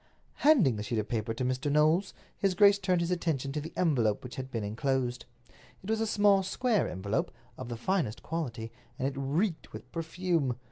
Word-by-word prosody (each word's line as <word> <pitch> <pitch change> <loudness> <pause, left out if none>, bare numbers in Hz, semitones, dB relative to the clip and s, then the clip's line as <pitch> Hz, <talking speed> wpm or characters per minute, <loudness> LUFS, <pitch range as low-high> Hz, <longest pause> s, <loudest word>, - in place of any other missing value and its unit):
Handing 225 - +4
the - - -3
sheet 110 +2 -3
of 110 - -1
paper 115 -1 -2
to 120 +3 -2
Mr. 130 +3 -1
Knowles, 155 +6 +3 0.2
his 195 -2 0
grace 200 +1 +6
turned 180 -2 +1
his 170 +1 -1
attention 155 -6 -1
to 150 +1 -3
the 160 - -7
envelope 120 - +2
which 125 -2 -8
had 130 0 -5
been 115 -4 -3
inclosed. 125 +3 -1 0.6
It 205 - -3
was 220 0 0
a 225 - +1
small, 205 -2 +4
square 215 +3 0
envelope, 95 +3 -2 0.3
of - - -7
the 120 - -4
finest 155 - -1
quality, 120 -9 -4 0.3
and 135 -1 0
it 140 - -3
reeked 155 +7 -1
with 110 +4 -10
perfume. 165 -5 -1
145 Hz, 195 wpm, -30 LUFS, 120-185 Hz, 0.6 s, grace